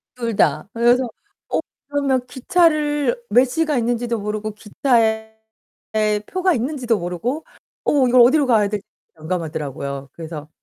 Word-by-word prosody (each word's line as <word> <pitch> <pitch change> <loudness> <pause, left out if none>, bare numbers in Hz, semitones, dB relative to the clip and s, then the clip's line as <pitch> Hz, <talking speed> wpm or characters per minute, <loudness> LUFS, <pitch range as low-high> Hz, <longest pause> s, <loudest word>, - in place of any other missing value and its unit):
둘 235 -3 -3
다. - - +2
그래서 240 +2 +4 0.5
어 - - +1 0.3
그러면 275 -3 0
기차를 300 - +1
몇 250 +2 +5
시가 305 +2 0
있는지도 235 0 0
모르고 210 +1 -3
기차에 220 0 0 0.9
표가 370 -1 +1
있는지도 245 -2 0
모르고 220 - -3 0.4
어 275 -3 +3
이걸 250 0 +6
어디로 275 +4 +5
가야 215 -4 +4
될지 205 -1 -4 0.3
난감하더라고요. 150 -5 -4
그래서 155 -2 -8
240 Hz, 305 characters per minute, -21 LUFS, 210-275 Hz, 0.9 s, 이걸